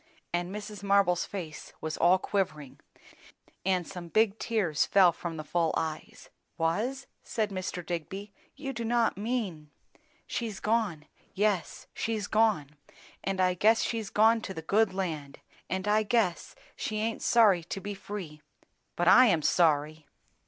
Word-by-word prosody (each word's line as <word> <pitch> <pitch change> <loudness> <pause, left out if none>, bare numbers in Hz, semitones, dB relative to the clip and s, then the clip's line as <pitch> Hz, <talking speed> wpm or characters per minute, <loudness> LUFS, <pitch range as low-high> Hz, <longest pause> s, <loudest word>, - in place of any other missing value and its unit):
And 175 0 -1
Mrs. 210 +1 -7
Marble's 200 -3 +3
face 165 -7 -7
was 155 0 -4
all 175 +2 +4
quivering, 185 -8 -3 0.8
and 185 -2 0
some 180 -3 -8
big 215 +3 +2
tears 200 -10 +1
fell 190 -3 +5
from 170 -1 -6
the 155 - -5
full 165 +1 0
eyes. 160 -1 -5 0.3
"Was?" 220 +12 -1 0.2
said 215 -3 -2
Mr. 185 -2 -4
Digby. 190 +4 -5 0.2
"You 275 -1 -5
do 235 -1 -4
not 235 0 +2
mean 200 -9 -3 0.3
" 310 -1 -37
"She's 225 -4 -4
gone. 210 -9 0 0.3
Yes, 200 -2 0
she's 220 -2 -2
gone. 215 -10 +2 0.5
And 195 -1 -2
I 185 -1 +3
guess 215 +5 +3
she's 225 -3 -2
gone 225 +2 +4
to 190 -3 -6
the 160 - -6
good 210 +4 +2
land; 160 -7 -4 0.3
and 190 +2 -2
I 210 +1 +4
guess 215 -5 0 0.2
she 215 - -3
aint 220 +1 -2
sorry 210 -7 +4
to 195 - -5
be 205 +1 -5
free; 190 -6 -7 0.5
but 175 - 0
I'm 195 -7 +6
sorry!" 155 -2 +2
195 Hz, 150 wpm, -29 LUFS, 170-220 Hz, 0.8 s, I'm